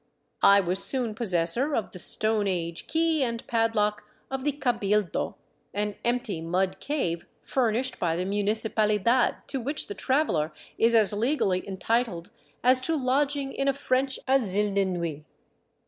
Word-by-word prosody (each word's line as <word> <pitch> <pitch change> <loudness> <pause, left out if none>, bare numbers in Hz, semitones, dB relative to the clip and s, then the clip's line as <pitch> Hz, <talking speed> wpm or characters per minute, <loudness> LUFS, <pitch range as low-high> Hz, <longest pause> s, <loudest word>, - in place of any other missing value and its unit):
I 200 0 +7
was 185 +1 0
soon 245 -5 -1
possessor 220 - 0
of 225 - -2
the 180 - -9
Stone 215 +2 +1
age 170 -3 -3
key 325 -1 +1
and 235 -3 -2
pad 225 -1 +1
lock 210 0 +1 0.3
of 265 -1 -3
the 295 - +2
cabildo, 210 - 0 0.4
an 210 0 -1
empty 240 -7 -1
mud 180 +3 -1
cave 175 - -2 0.2
furnished 255 0 0
by 165 -2 0
the 180 +2 -2
municipal 210 +2 0
idad, 230 +4 +2
to 270 - -3
which 285 +6 -3
the 205 - -6
traveler 230 - 0 0.3
is 230 +1 +4
as 215 -3 +5
legally 205 -5 +1
entitled 195 -2 -1 0.3
as 255 +1 +5
to 325 +5 0
lodging 275 0 0
in 275 - -1
a 275 - +3
French 265 -1 0
asile 210 -6 +2
de 200 0 +2
nuit. 170 -5 -3
220 Hz, 155 wpm, -27 LUFS, 195-260 Hz, 0.4 s, I